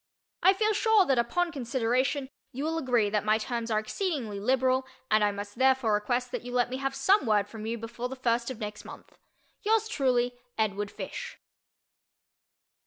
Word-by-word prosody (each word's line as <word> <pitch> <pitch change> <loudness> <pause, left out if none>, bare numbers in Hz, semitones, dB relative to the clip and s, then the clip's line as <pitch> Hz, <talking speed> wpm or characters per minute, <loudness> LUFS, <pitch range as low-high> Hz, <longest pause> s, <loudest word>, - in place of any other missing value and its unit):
I 375 +2 +6
feel 430 +2 +1
sure 430 -2 +4
that 265 -6 +2
upon 340 +9 0
consideration 260 +1 0 0.2
you 270 +2 -5
will 325 +1 -1
agree 240 -8 +1
that 210 -1 +1
my 215 +1 +3
terms 235 +1 -3
are 215 - +1
exceedingly 225 - -2
liberal 260 +3 +2 0.2
and 215 0 +4
I 205 - +3
must 205 +3 -7
therefore 260 -4 +3
request 245 +4 0
that - - -3
you 245 - -8
let 245 0 +1
me 260 - -2
have 270 0 -2
some 390 - +3
word 205 -2 +3
from 220 0 -7
you 230 +1 -2
before 235 +2 -5
the 265 - -6
first 235 -2 0
of 260 - -5
next 210 -1 -6
month. - - -12 0.5
Yours 440 +1 +2
truly, 250 - +1 0.2
EDWARD 205 -2 0
FISH. - - -7
245 Hz, 180 wpm, -28 LUFS, 220-270 Hz, 0.5 s, I